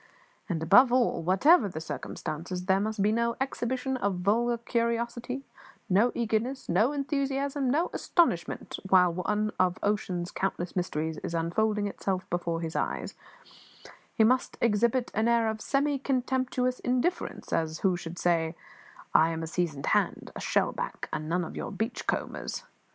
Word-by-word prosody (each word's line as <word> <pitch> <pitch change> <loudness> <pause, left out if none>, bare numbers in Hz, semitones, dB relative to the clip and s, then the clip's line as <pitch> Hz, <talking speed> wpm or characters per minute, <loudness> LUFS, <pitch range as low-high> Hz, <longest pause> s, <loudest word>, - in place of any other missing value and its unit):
And, 165 -3 -1
above 220 +10 +7
all, 245 -7 +2
whatever 205 - +5
the 155 - -5
circumstances, 170 +2 -5
there 190 0 +3
must 210 0 -1
be 210 - +3
no 235 +1 +1
exhibition 260 0 -2
of 200 -5 0
vulgar 235 +5 +2
curiosity, 235 +2 -2 0.4
no 210 +6 +4
eagerness, 235 +3 -1
no 215 +10 +3
enthusiasm, 275 -1 -1
no 315 +7 +1
astonishment 250 - 0
while 180 -2 +5
one 210 +4 -1
of 180 -1 +2
ocean's 185 -4 -1
countless 180 -2 -3
mysteries 160 -3 -2
is 170 - -4
unfolding 205 +6 +1
itself 190 -2 -2
before 170 -1 -1
his 165 0 -4
eyes; - - -2 1.0
he 220 - +4
must 250 +3 +2
exhibit 235 +2 +2
an 220 +2 +1
air 235 -1 +3
of 220 0 -2
semi 280 +2 +1
contemptuous 255 -1 0
indifference, 255 +8 -1
as 160 0 -1
who 190 -2 +3
should 175 0 -7
say, 165 -2 +1 0.6
"I 160 +1 +6
am 165 0 -3
a - - -2
seasoned 160 -4 -2
hand - - 0
a - - -5
shell - - +1
back, - - -5
and 155 0 -3
none 180 +2 +1
of - - -8
your - - -4
beach 220 +5 -3
combers. - - -3
215 Hz, 155 wpm, -28 LUFS, 175-250 Hz, 1.0 s, above